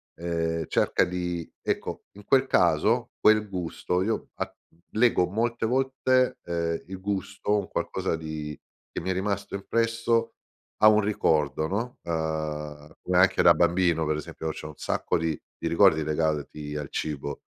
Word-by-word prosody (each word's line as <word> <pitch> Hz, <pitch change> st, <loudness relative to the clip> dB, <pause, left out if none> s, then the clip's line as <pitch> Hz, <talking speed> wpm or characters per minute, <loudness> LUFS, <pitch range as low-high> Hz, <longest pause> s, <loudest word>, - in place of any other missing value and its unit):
ehm, 80 Hz, -1 st, -2 dB
cerca -, -, +2 dB
di 90 Hz, -2 st, -3 dB
ecco, -, -, -3 dB
in 105 Hz, +1 st, -13 dB
quel 135 Hz, 0 st, +4 dB
caso 95 Hz, +8 st, +2 dB
quel 105 Hz, -1 st, +4 dB
gusto 90 Hz, -1 st, -2 dB
io 110 Hz, +3 st, -1 dB
a -, -, -3 dB, 0.4 s
lego 110 Hz, -5 st, +3 dB
molte 115 Hz, +2 st, 0 dB
volte, 130 Hz, 0 st, +1 dB
ehm, 85 Hz, -1 st, -2 dB
il 95 Hz, 0 st, -7 dB
gusto, 100 Hz, +1 st, -2 dB
un 100 Hz, -, -5 dB
qualcosa -, -, -2 dB
di 80 Hz, -2 st, -6 dB, 0.3 s
che -, -, -4 dB
mi 95 Hz, -, -2 dB
è -, -, +1 dB
rimasto 100 Hz, +1 st, -2 dB
impresso 115 Hz, +2 st, 0 dB, 0.4 s
a 110 Hz, -, +6 dB
un 110 Hz, 0 st, +6 dB
ricordo, 80 Hz, -7 st, +1 dB
no. 115 Hz, +7 st, -3 dB
Ehm, 75 Hz, -2 st, -4 dB
come 90 Hz, 0 st, 0 dB
anche 95 Hz, -, +4 dB
da -, -, +8 dB
bambino, 85 Hz, -2 st, +2 dB
per 75 Hz, -, +1 dB
esempio, 80 Hz, +1 st, -5 dB
c'ho 75 Hz, 0 st, -6 dB
un -, -, -9 dB
sacco -, -, -1 dB
di 80 Hz, -2 st, -1 dB, 0.2 s
di -, -, -1 dB
ricordi 80 Hz, 0 st, +5 dB
legati 75 Hz, -1 st, -2 dB
al 75 Hz, -2 st, -4 dB
cibo. 70 Hz, -2 st, -4 dB
90 Hz, 155 wpm, -27 LUFS, 80-105 Hz, 0.4 s, da